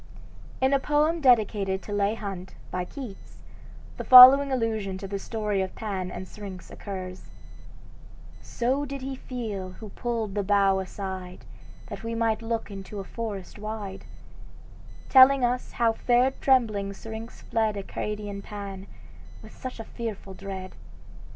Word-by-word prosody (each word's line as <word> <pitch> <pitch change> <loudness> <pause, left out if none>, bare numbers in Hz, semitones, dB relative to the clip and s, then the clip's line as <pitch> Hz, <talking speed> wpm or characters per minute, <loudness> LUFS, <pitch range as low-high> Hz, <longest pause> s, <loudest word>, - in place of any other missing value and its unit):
In 265 +1 +3
a 275 - +4
poem 300 +4 +1
dedicated 210 -7 +3
to - - -9
Leigh 205 +1 +1
Hunt, 195 -4 -7 0.2
by 180 -1 -2
Keats, 245 -3 -10 0.5
the - - -4
following 260 +2 +10
allusion 220 -6 -1
to 195 - -7
the 200 0 -4
story 210 -2 -2
of 190 -1 -4
Pan 195 -4 -4
and 185 +1 -7
Syrinx 195 -3 -9
occurs: 185 -2 -7 1.1
"So 260 +4 -1
did 275 -1 -6
he 270 0 -4
feel 215 -8 -5
who 215 +2 -10
pulled 225 -1 -3
the 205 - 0
bough 195 -1 +3
aside, 190 -1 -6 0.4
That - - -8
we 230 0 -3
might 225 -1 +1
look 225 -1 -3
into 195 +1 -7
a - - -4
forest 205 -1 -6
wide, 210 -2 -6 1.0
Telling 265 -1 +7
us 250 +1 -2
how 230 -1 +2
fair 245 +3 +3
trembling 220 -8 +1
Syrinx 225 +3 -9
fled 220 -2 0
Arcadian 205 0 -5
Pan, 200 -2 -8 0.6
with - - -13
such 255 -3 -7
a - - -4
fearful 220 -4 -6
dread. 190 -1 -7
210 Hz, 145 wpm, -26 LUFS, 195-240 Hz, 1.1 s, following